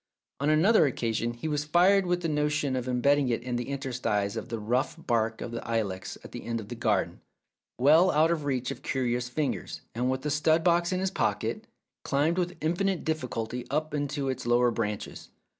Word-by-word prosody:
On 140 +2 +1
another 160 +3 +5
occasion 120 -2 -1
he 120 +7 -5
was 150 -1 0
fired 180 +5 +4
with 175 0 +1
the 165 - -1
original 150 -1 +1
notion 145 -2 0
of 125 -1 -3
embedding 135 +2 +2
it 115 - -1
in 125 -1 -3
the 120 +1 -3
interstices 125 -7 -1
of 115 - -5
the 115 - -3
rough 120 +5 0
bark 115 -2 -1
of 120 - -5
the 115 - -4
ilex 105 -5 -2
at - - -11
the - - -7
end 115 0 -2
of 105 -1 -9
the 120 - -5
garden, 110 -5 0 0.6
well 155 +8 +6
out 160 +1 +3
of 160 -3 -1
reach 130 -3 -1
of - - -7
curious 125 -2 -1
fingers, 145 +3 -3
and 125 +2 0
with 130 0 -2
the 150 - -1
stud 155 +2 +3
box 170 0 +3
in 185 - 0
his 190 0 0
pocket, - - -1 0.4
climbed 155 +6 +1
with 180 0 -2
infinite 175 +4 0
difficulty 125 -6 -3
up 155 +3 -1
into 145 -1 -2
its 130 -2 -3
lower 120 0 +4
branches. 105 -3 -4
135 Hz, 205 wpm, -28 LUFS, 120-155 Hz, 0.6 s, well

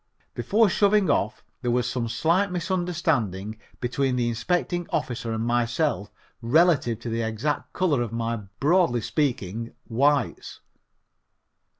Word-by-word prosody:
Before 205 - +3
shoving 200 +1 +3
off 105 - -1 0.2
there 125 - -1
was 125 0 +1
some 125 -2 -2
slight 170 - +2
misunderstanding 160 - -1 0.2
between 125 +1 0
the 120 -1 +1
inspecting 175 +8 -1
officer 120 -2 -2
and 110 0 -2
myself 120 -1 0 0.3
relative 130 -3 +3
to 120 - -5
the 115 +1 -1
exact 115 +7 -2
color 160 -9 +1
of 120 -2 -3
my, 115 0 -2 0.2
broadly 145 -5 +3
speaking, 115 - -2
Whites. 140 +2 0
125 Hz, 120 wpm, -25 LUFS, 115-170 Hz, 0.3 s, Before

